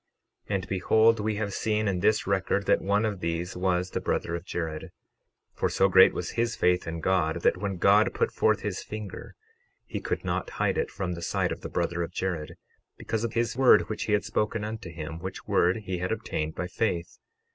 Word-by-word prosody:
12:20 100 - +1
And 95 -2 -3
behold, 110 +4 +3
we 105 0 -1
have 100 -1 -2
seen 110 -1 0
in 95 -3 0
this 105 +3 +2
record 100 0 0
that - - +3
one 100 +3 +1
of 105 -3 -2
these 85 +1 -3
was 90 0 0
the - - -2
brother 85 - -1
of 85 - -5
Jared; 80 -4 -4 0.6
for - - 0
so 95 - +3
great 95 0 +7
was 90 - -4
his 115 0 0
faith 90 -1 +2
in 80 0 -4
God, 85 -2 +1
that - - +3
when 100 0 -3
God - - +5
put - - 0
forth - - +2
his - - -3
finger 105 -3 -8 0.5
he - - -4
could - - -3
not - - -2
hide - - +1
it 465 -1 -1
from 90 - -3
the 85 - -7
sight - - 0
of - - -5
the - - -6
brother 85 0 -1
of 85 - -3
Jared, 85 -5 -3 0.4
because 110 0 -3
of 115 -1 -2
his 115 0 0
word 130 0 +5
which 110 - -3
he 105 - 0
had 105 - +2
spoken 105 0 -1
unto 105 -4 -5
him, 80 0 -6
which 95 +2 -7
word 90 +5 +2
he 95 -2 -3
had 90 +1 -2
obtained 80 0 -3
by 90 - -3
faith. 90 -2 -2
95 Hz, 215 wpm, -27 LUFS, 85-105 Hz, 0.6 s, great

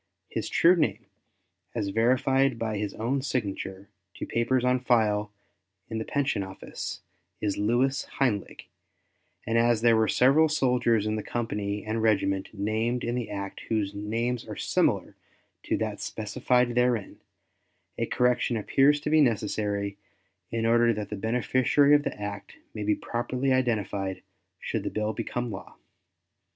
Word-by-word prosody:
His - - -3
true 175 +2 +5
name, 160 -4 0 0.7
as 105 -4 -1
verified 130 +4 +2
by 110 -2 -2
his 105 -2 -3
own 125 +5 -1
signature 100 -6 -3 0.3
to - - -5
papers 125 +2 +1
on 125 0 +3
file 105 -4 +2 0.6
in 110 - -2
the 110 - -4
Pension 140 -7 0
Office, 95 0 -6 0.4
is 100 -2 -1
Louis 125 +6 +1
Heinlig, 115 -8 -1 0.8
and 115 +1 +2
as 120 -1 +3
there 115 -1 +5
were 110 0 +3
several 145 +5 +4
soldiers 125 -7 +2
in 110 0 -1
the - - -2
company 105 -3 -3
and 110 +1 -1
regiment 100 -3 +1
named 110 +4 -1
in 120 - -1
the 120 -3 -3
act 100 -1 -5
whose 105 -3 0
names 115 +4 -2
are - - -6
similar - - 0 0.5
to - - 0
that - - -3
specified 120 +3 0
therein, 120 -4 0 0.8
a - - 0
correction 125 -1 +1
appears 140 +7 +3
to 150 - -2
be 155 0 +6
necessary 105 -4 0 0.5
in 115 0 -1
order 120 0 +4
that 105 -1 -5
the 105 - -4
beneficiary 125 +6 +2
of 145 - +6
the 145 - -5
act 105 -1 -6 0.2
may 105 - -5
be 105 0 +2
properly 125 +3 -1
identified 105 -6 -1 0.4
should - - -3
the - - -3
bill 110 0 -2
become 120 +3 -3
a - - -4
law. - - -13
115 Hz, 150 wpm, -27 LUFS, 105-125 Hz, 0.8 s, be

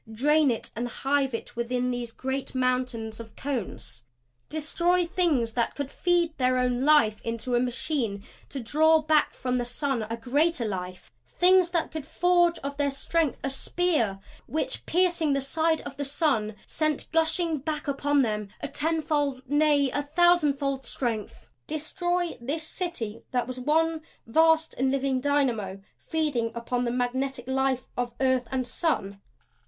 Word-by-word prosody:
Drain 295 +6 +3
it 230 - -3
and 240 +2 -2
hive 270 +1 0
it - - -7
within 245 +1 -1
these 245 -1 -4
great 265 +2 -4
mountains 250 -3 -1
of 230 - -7
the - - -16
cones! 220 - -4 0.5
Destroy 340 +4 +1
Things 325 -10 +1
that 235 0 -1
could 285 -1 -4
feed 345 -3 +1
their 255 0 +3
own 250 0 +1
life 255 -8 +4
into 230 +2 -3
a 240 - +4
machine 245 -4 -1 0.3
to 275 - -4
draw 310 +6 +3
back 305 0 +3
from 250 -1 -1
the - - 0
sun 250 +1 -1
a 230 - -3
greater 275 +3 +1
life 185 -3 -5 0.2
Things 365 0 +4
that 340 -2 -1
could 315 -2 -6
forge 350 0 +3
of 280 0 -4
their 285 -1 +2
strength 300 +2 0
a 270 - -1
spear 270 - 0 0.3
which, 315 - -3
piercing 340 -4 +2
the 275 - +1
side 320 +4 +1
of 275 -1 -9
the 285 - -2
sun, 270 -7 0
sent 310 -2 -1
gushing 325 0 +1
back 305 +2 -4
upon 285 0 +2
them 210 -3 -2
a - - -4
tenfold, 295 -4 -1
nay, 290 -1 +3
a 290 - 0
thousandfold 290 -4 +2
strength! 230 -4 -3 0.2
Destroy 350 +3 -1
this 295 +6 -2
City 315 - -4
that 245 -1 0
was 255 +1 -6
one 320 +4 +1 0.2
vast 320 +5 +3
and 265 +1 +2
living 270 -1 0
dynamo 245 -9 0 0.2
feeding 290 -8 -1
upon 245 +1 -2
the 235 - 0
magnetic 250 +1 -2
life 265 -1 +1
of 245 -1 -2
earth 260 -2 +2
and 260 -1 -1
sun! 200 - -2
275 Hz, 160 wpm, -27 LUFS, 245-315 Hz, 0.5 s, life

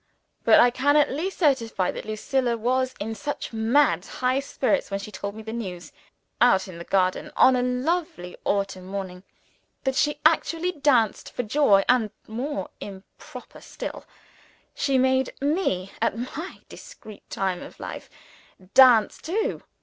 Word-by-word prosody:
But - - +6
I 245 - +6
can 285 +4 +2
at 295 - +3
least 335 +8 -3
certify 230 - +1
that - - -8
Lucilla 235 +3 -1
was 255 +3 0
in 220 +2 -3
such 265 +3 -5
mad 220 - +2
high 255 +5 -1
spirits 280 0 -1
when 195 0 -2
she 205 +2 -8
told 200 +1 -6
me 220 - -9
the 220 +1 -6
news 180 -8 -6 0.5
out 240 -6 +4
in 175 -3 -10
the - - -6
garden, 185 0 0
on 260 - +6
a 250 - +1
lovely 250 - -2
autumn 195 -2 -2
morning, 190 -2 -6 0.6
that 265 -1 0
she 295 +3 +1
actually 330 +2 +2
danced 275 - +1
for 245 - -3
joy 215 -4 +4
and, 245 -4 +3 0.2
more 235 -2 -4
improper 195 -1 -11
still, - - -7 0.7
she 275 -2 +1
made 260 0 +1
me, 280 - -1
at - - +1
my 280 +9 -6
discreet 220 - -13
time 190 -2 -2
of - - -11
life, - - -7 0.6
dance 245 -5 +6
too. 430 +9 -2
245 Hz, 150 wpm, -25 LUFS, 200-280 Hz, 0.7 s, But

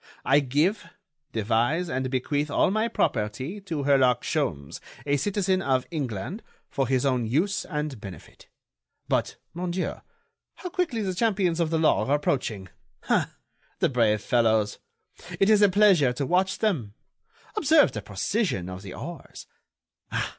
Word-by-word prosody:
I 140 +2 +5
give, 150 - 0 0.4
devise 115 - +1
and 130 -2 -2
bequeath 145 +3 -1
all 145 - +2
my 215 +3 +1
property 135 - -2
to 165 -7 -4
Herlock 130 -4 +3
Sholmes, 80 - -2 0.3
a 145 0 +2
citizen 190 +4 0
of 130 -6 +1
England, 140 - -4 0.3
for 135 -2 0
his 130 +1 +1
own 125 -4 +1
use 175 - 0
and 150 - -4
benefit. 95 -4 -11 0.6
But, - - 0 0.2
mon 180 +1 -3
Dieu, 180 +1 -3 0.5
how 360 - -7
quickly 340 - -1
the 190 -2 -1
champions 190 -4 +1
of 165 -2 +1
the 165 - +1
law 160 -4 +2
are 140 - +3
approaching! 110 -9 -2 0.4
Ah! - - +1 0.4
the - - +2
brave 110 -4 +2
fellows! 110 -4 +2 0.6
It 195 +2 +4
is 210 -1 +5
a 205 - +6
pleasure 185 -10 +4
to 140 +3 -2
watch 185 +6 +1
them. 140 - -1 0.6
Observe 315 -6 +4
the 105 - -5
precision 100 - -2
of 90 0 -7
the 95 -2 -9
oars! - - -9
145 Hz, 145 wpm, -26 LUFS, 120-190 Hz, 0.6 s, a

